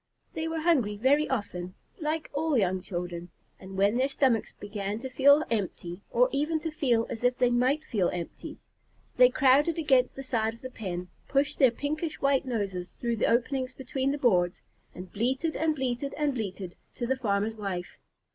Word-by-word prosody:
They 320 Hz, 0 st, -3 dB
were 325 Hz, 0 st, -2 dB
hungry 260 Hz, -12 st, +2 dB
very 280 Hz, +7 st, +3 dB
often, 185 Hz, -7 st, -3 dB, 0.2 s
like 310 Hz, 0 st, -2 dB
all 300 Hz, -1 st, +1 dB
young 185 Hz, -3 st, +1 dB
children, 175 Hz, -1 st, -5 dB, 0.3 s
and 190 Hz, 0 st, -9 dB
when 200 Hz, +4 st, +3 dB
their 260 Hz, +1 st, +3 dB
stomachs 260 Hz, -5 st, +1 dB
began 205 Hz, 0 st, -4 dB
to 260 Hz, 0 st, -6 dB
feel 285 Hz, +4 st, +6 dB
empty, 185 Hz, -4 st, -3 dB
or 250 Hz, +1 st, +4 dB
even 300 Hz, +3 st, 0 dB
to 320 Hz, -, -3 dB
feel 245 Hz, -7 st, +1 dB
as 225 Hz, -, -5 dB
if 245 Hz, +1 st, +2 dB
they 250 Hz, -1 st, +3 dB
might 255 Hz, +5 st, +2 dB
feel 200 Hz, -, 0 dB
empty, 175 Hz, -1 st, -6 dB, 0.6 s
they 250 Hz, 0 st, +8 dB
crowded 275 Hz, +5 st, +4 dB
against 265 Hz, -5 st, +3 dB
the 270 Hz, -, -6 dB
side 225 Hz, -3 st, -1 dB
of 230 Hz, -, -20 dB
the 255 Hz, -, -7 dB
pen, 180 Hz, -6 st, -5 dB, 0.2 s
pushed 285 Hz, +1 st, 0 dB
their 265 Hz, -, +7 dB
pinkish 305 Hz, +6 st, -3 dB
white 275 Hz, -1 st, +2 dB
noses 195 Hz, -7 st, -3 dB
through 235 Hz, -1 st, -2 dB
the -, -, +2 dB
openings 255 Hz, +2 st, 0 dB
between 265 Hz, +1 st, -2 dB
the 285 Hz, -, -2 dB
boards, 180 Hz, -10 st, +2 dB, 0.3 s
and 180 Hz, 0 st, -9 dB
bleated 260 Hz, +9 st, 0 dB
and 315 Hz, -1 st, +1 dB
bleated 265 Hz, 0 st, -2 dB
and 295 Hz, -2 st, +1 dB
bleated 195 Hz, -6 st, -5 dB, 0.2 s
to 240 Hz, -, -3 dB
the 265 Hz, +2 st, +1 dB
farmer's 220 Hz, -3 st, -1 dB
wife. 190 Hz, -4 st, -5 dB
250 Hz, 185 wpm, -28 LUFS, 205-280 Hz, 0.6 s, they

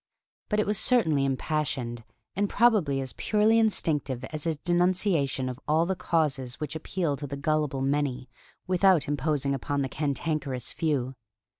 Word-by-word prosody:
But 210 Hz, -, +1 dB
it 210 Hz, -, +2 dB
was 210 Hz, 0 st, 0 dB
certainly 160 Hz, -, +2 dB
impassioned, 130 Hz, -4 st, -2 dB, 0.3 s
and 200 Hz, +2 st, 0 dB
probably 200 Hz, -, +3 dB
as 130 Hz, -, -5 dB
purely 215 Hz, +1 st, +3 dB
instinctive 150 Hz, -, 0 dB
as 155 Hz, 0 st, -4 dB
his 160 Hz, -2 st, 0 dB
denunciation 175 Hz, -5 st, +1 dB
of 125 Hz, 0 st, -5 dB
all 160 Hz, +2 st, +3 dB
the 190 Hz, +2 st, -1 dB
causes 140 Hz, -8 st, -1 dB
which 150 Hz, 0 st, -4 dB
appeal 160 Hz, -1 st, -2 dB
to 145 Hz, -, -6 dB
the 140 Hz, +1 st, -5 dB
gullible 145 Hz, -2 st, 0 dB
many 135 Hz, -2 st, -1 dB, 0.4 s
without 185 Hz, -4 st, +3 dB
imposing 145 Hz, -1 st, 0 dB
upon 140 Hz, +1 st, -1 dB
the 135 Hz, -, -3 dB
cantankerous 145 Hz, -3 st, -2 dB
few. 135 Hz, -5 st, -1 dB
150 Hz, 150 wpm, -27 LUFS, 135-175 Hz, 0.4 s, probably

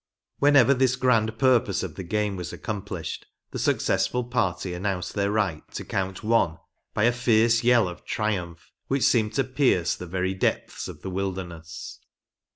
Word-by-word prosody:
Whenever 140 Hz, -2 st, +6 dB
this 130 Hz, -1 st, +2 dB
grand 115 Hz, -4 st, +2 dB
purpose 125 Hz, -7 st, +3 dB
of 90 Hz, -5 st, -5 dB
the 85 Hz, -, -7 dB
game 105 Hz, +2 st, -1 dB
was 90 Hz, -2 st, -5 dB
accomplished, 95 Hz, -6 st, -5 dB, 0.2 s
the -, -, -4 dB
successful 125 Hz, 0 st, +1 dB
party 95 Hz, -6 st, -1 dB
announced 90 Hz, 0 st, -3 dB
their 100 Hz, -1 st, 0 dB
right 100 Hz, -8 st, 0 dB
to -, -, -5 dB
count 95 Hz, -1 st, -3 dB
one 105 Hz, -7 st, +2 dB, 0.4 s
by 105 Hz, -, +1 dB
a 120 Hz, -, +5 dB
fierce 115 Hz, -1 st, +3 dB
yell 120 Hz, -4 st, +4 dB
of 90 Hz, -, -8 dB
triumph, 90 Hz, -6 st, -3 dB, 0.2 s
which 135 Hz, -1 st, 0 dB
seemed 110 Hz, -3 st, +3 dB
to 135 Hz, -, +2 dB
pierce 130 Hz, -, +2 dB
the 90 Hz, -, -7 dB
very 95 Hz, +2 st, -1 dB
depths 95 Hz, -, -2 dB
of -, -, -10 dB
the 95 Hz, -, -4 dB
wilderness. 90 Hz, -4 st, -5 dB
105 Hz, 165 wpm, -25 LUFS, 90-120 Hz, 0.4 s, Whenever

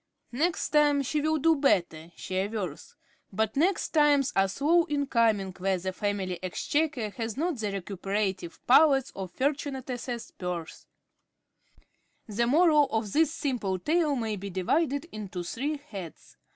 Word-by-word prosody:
Next 325 Hz, +8 st, 0 dB
time 295 Hz, -2 st, +3 dB
she 295 Hz, +3 st, -1 dB
will 315 Hz, +1 st, +1 dB
do 325 Hz, +2 st, +4 dB
better, 175 Hz, -, +1 dB
she -, -, -8 dB
avers; 190 Hz, -4 st, -3 dB, 0.4 s
but 220 Hz, +2 st, -1 dB
next 345 Hz, +6 st, +1 dB
times 295 Hz, -3 st, +3 dB
are 195 Hz, 0 st, +4 dB
slow 315 Hz, -, +2 dB
in 285 Hz, -1 st, -1 dB
coming 220 Hz, -7 st, +2 dB
where 190 Hz, 0 st, +1 dB
the 185 Hz, +1 st, -4 dB
family 195 Hz, -2 st, -2 dB
exchequer 245 Hz, -, -1 dB
has 225 Hz, +1 st, -5 dB
not 325 Hz, -3 st, -1 dB
the 210 Hz, -2 st, -2 dB
recuperative 195 Hz, -1 st, -3 dB
powers 270 Hz, 0 st, +5 dB
of 190 Hz, -1 st, -5 dB
Fortunatus's 260 Hz, -2 st, -3 dB
purse. 180 Hz, -3 st, -6 dB, 1.4 s
The 235 Hz, +2 st, 0 dB
Moral 305 Hz, +1 st, +5 dB
of 220 Hz, -3 st, -2 dB
this 315 Hz, -1 st, +3 dB
simple 245 Hz, -12 st, -2 dB
tale 305 Hz, -, +1 dB
may 220 Hz, -4 st, -2 dB
be 200 Hz, +1 st, -6 dB
divided 280 Hz, -, 0 dB
into 195 Hz, -4 st, -6 dB
three 280 Hz, -, -3 dB
heads. 200 Hz, -, -10 dB
235 Hz, 140 wpm, -28 LUFS, 195-295 Hz, 1.4 s, powers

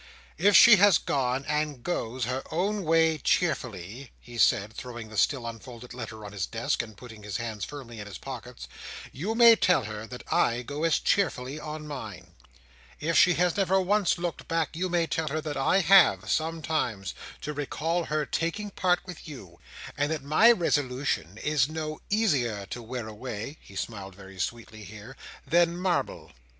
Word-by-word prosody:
"If 200 Hz, +3 st, +5 dB
she 230 Hz, -2 st, +9 dB
has 195 Hz, -3 st, +6 dB
gone, 130 Hz, -1 st, -1 dB
and 150 Hz, -4 st, -2 dB
goes, 125 Hz, -7 st, -2 dB
her 130 Hz, +2 st, -2 dB
own 195 Hz, +4 st, -1 dB
way 160 Hz, 0 st, +3 dB
cheerfully," 125 Hz, -, -1 dB
he 120 Hz, -1 st, -10 dB
said, 105 Hz, 0 st, +3 dB
throwing 120 Hz, -2 st, -8 dB
the 110 Hz, -, -10 dB
still 130 Hz, +2 st, +1 dB
unfolded 115 Hz, +1 st, -9 dB
letter 110 Hz, -3 st, -7 dB
on 100 Hz, -, -8 dB
his 100 Hz, -4 st, -3 dB
desk, -, -, -1 dB
and 110 Hz, -3 st, -11 dB
putting 115 Hz, -2 st, -12 dB
his 105 Hz, -2 st, -4 dB
hands 110 Hz, -3 st, -4 dB
firmly 125 Hz, -6 st, -9 dB
in 105 Hz, -, -7 dB
his 100 Hz, -4 st, -8 dB
pockets, 125 Hz, -2 st, -8 dB, 0.4 s
"you 200 Hz, +11 st, -3 dB
may 235 Hz, -1 st, +8 dB
tell 180 Hz, -, +3 dB
her 110 Hz, +1 st, -6 dB
that 125 Hz, +1 st, -9 dB
I 120 Hz, +1 st, +2 dB
go 145 Hz, +6 st, -3 dB
as 165 Hz, -, +3 dB
cheerfully 145 Hz, -7 st, 0 dB
on 155 Hz, 0 st, -7 dB
mine. 110 Hz, -10 st, -8 dB, 0.7 s
If 165 Hz, +2 st, -1 dB
she 180 Hz, -, +6 dB
has 180 Hz, 0 st, +2 dB
never 190 Hz, -1 st, +2 dB
once 195 Hz, 0 st, +2 dB
looked 175 Hz, -1 st, -4 dB
back, 165 Hz, -1 st, -1 dB
you 185 Hz, +3 st, -1 dB
may 170 Hz, -1 st, +1 dB
tell 160 Hz, -1 st, -2 dB
her 155 Hz, +2 st, -1 dB
that 150 Hz, -1 st, -4 dB
I 160 Hz, +8 st, +2 dB
have, 155 Hz, -, +5 dB
sometimes, 155 Hz, -, -1 dB, 0.3 s
to 150 Hz, -, -4 dB
recall 160 Hz, +4 st, -2 dB
her 150 Hz, 0 st, -1 dB
taking 185 Hz, +8 st, -2 dB
part 180 Hz, -2 st, +1 dB
with 180 Hz, -2 st, -10 dB
you, 95 Hz, -, -11 dB, 0.4 s
and 145 Hz, +1 st, 0 dB
that 155 Hz, -4 st, -3 dB
my 155 Hz, +12 st, +6 dB
resolution 135 Hz, -, 0 dB
is 150 Hz, -3 st, +2 dB
no 155 Hz, -1 st, -5 dB
easier 135 Hz, -, +1 dB
to 120 Hz, -, -5 dB
wear 120 Hz, 0 st, -6 dB
away;" 110 Hz, +5 st, -7 dB
he 100 Hz, -, -15 dB
smiled 95 Hz, -2 st, -5 dB
very 95 Hz, -1 st, -13 dB
sweetly 110 Hz, +1 st, -5 dB
here; 105 Hz, +6 st, -11 dB, 0.3 s
"than 170 Hz, 0 st, +3 dB
marble." 180 Hz, -1 st, -2 dB
140 Hz, 175 wpm, -27 LUFS, 115-165 Hz, 0.7 s, she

